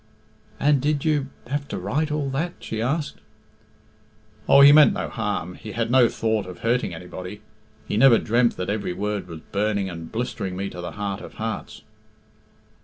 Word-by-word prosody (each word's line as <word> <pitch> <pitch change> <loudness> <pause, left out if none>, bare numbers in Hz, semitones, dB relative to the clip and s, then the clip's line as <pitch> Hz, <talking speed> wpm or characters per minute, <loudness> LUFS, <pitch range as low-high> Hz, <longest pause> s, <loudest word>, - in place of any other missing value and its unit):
"And 145 -1 +3
did 145 +1 0
you 150 -3 +1 0.2
have 140 +3 -3
to - - -4
write 140 - -1
all 150 -2 -1
that?" 165 +6 -2
she 110 - -5
asked. 140 +5 -1 1.3
"Oh, 140 - +8
he 140 +1 +10
meant 150 0 +7
no - - -3
harm. 105 -5 -3
He 105 +3 -9
had 115 0 -1
no 125 -2 +6
thought 110 -3 -1
of 90 - -10
hurting 120 -2 +1
anybody! 90 +4 -8 0.5
He - - -1
never 120 0 +7
dreamt 120 +1 +1
that 90 - -3
every 100 -4 -2
word 105 -1 -3
was 80 -2 -9
burning 100 -2 0
and 80 -1 -8
blistering 110 -5 -3
me 100 +1 -3
to 90 - -7
the 90 - -6
heart 100 0 -4
of - - -11
hearts." 110 -2 -5
110 Hz, 180 wpm, -24 LUFS, 100-135 Hz, 1.3 s, he